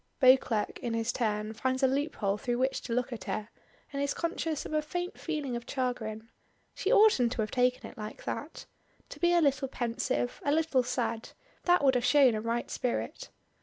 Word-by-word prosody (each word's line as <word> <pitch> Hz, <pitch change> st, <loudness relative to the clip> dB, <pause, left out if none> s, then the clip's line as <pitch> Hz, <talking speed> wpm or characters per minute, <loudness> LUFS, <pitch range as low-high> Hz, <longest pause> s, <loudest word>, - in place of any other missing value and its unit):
Beauclerk 255 Hz, -5 st, +4 dB
in 235 Hz, -3 st, -2 dB
his 230 Hz, +2 st, -1 dB
turn 215 Hz, -2 st, -1 dB
finds 260 Hz, +3 st, -1 dB
a -, -, +7 dB
loop 280 Hz, +4 st, -1 dB
hole 200 Hz, -2 st, 0 dB
through 240 Hz, +3 st, -2 dB
which 260 Hz, +2 st, 0 dB
to 245 Hz, -, -7 dB
look 250 Hz, +1 st, -1 dB
at 230 Hz, -, -7 dB
her, 215 Hz, 0 st, -3 dB, 0.4 s
and 280 Hz, -, -2 dB
is 280 Hz, 0 st, 0 dB
conscious 330 Hz, -2 st, -2 dB
of -, -, -6 dB
a 305 Hz, -, +2 dB
faint 355 Hz, +4 st, -4 dB
feeling 300 Hz, -6 st, -3 dB
of 235 Hz, 0 st, -6 dB
chagrin. 230 Hz, -4 st, -3 dB, 0.5 s
She 395 Hz, -, -1 dB
oughtn't 410 Hz, -, +5 dB
to 235 Hz, -, -1 dB
have 215 Hz, -, -2 dB
taken 250 Hz, 0 st, +1 dB
it -, -, -13 dB
like 215 Hz, 0 st, -7 dB
that. -, -, -5 dB, 0.4 s
To -, -, -10 dB
be 345 Hz, 0 st, +3 dB
a 345 Hz, -1 st, +4 dB
little 275 Hz, -3 st, +2 dB
pensive 245 Hz, 0 st, -2 dB
a 285 Hz, -, +1 dB
little 310 Hz, -4 st, +2 dB
sad 240 Hz, -2 st, -2 dB, 0.4 s
that 355 Hz, -3 st, +4 dB
would 265 Hz, -1 st, +5 dB
have 250 Hz, -1 st, +1 dB
shewn 275 Hz, -3 st, +5 dB
a 215 Hz, -, -2 dB
right 230 Hz, +1 st, -2 dB
spirit. 245 Hz, -, -3 dB
255 Hz, 205 wpm, -30 LUFS, 230-285 Hz, 0.5 s, a